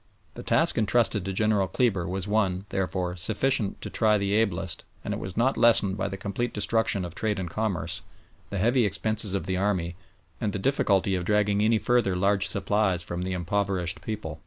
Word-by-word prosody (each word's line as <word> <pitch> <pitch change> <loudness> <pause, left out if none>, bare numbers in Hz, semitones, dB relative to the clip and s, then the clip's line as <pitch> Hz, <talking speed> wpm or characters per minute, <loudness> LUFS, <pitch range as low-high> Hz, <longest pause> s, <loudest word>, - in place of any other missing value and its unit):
The - - -8
task - - +2
entrusted 105 -2 +2
to 95 - -2
General 105 0 +1
Kleber 95 -4 0
was 95 +2 -3
one, 100 -3 0
therefore, 90 -2 -2
sufficient 105 +3 0
to - - -5
try 110 -2 +3
the 100 0 -1
ablest, 95 -6 0 0.2
and - - -2
it - - -4
was 95 +1 -7
not 130 +4 +2
lessened 110 -4 +4
by 95 -1 -2
the 95 0 -5
complete 100 +5 -3
destruction 105 -2 +1
of 85 - -7
trade 105 +2 -1
and 95 -1 -3
commerce, 105 -1 -2 0.5
the 100 - -4
heavy 120 +6 +3
expenses 105 0 0
of 90 -4 -2
the 95 -1 -1
army, 90 -3 -1 0.5
and 105 -3 -1
the - - -1
difficulty 100 -5 +1
of 90 -1 -1
dragging 105 0 +2
any 110 +1 +3
further 120 -5 +1
large 100 +1 +1
supplies 100 -3 +1
from 85 +1 -5
the 95 +1 -2
impoverished 90 -1 -1
people. 90 -8 -5
100 Hz, 190 wpm, -26 LUFS, 95-110 Hz, 0.5 s, lessened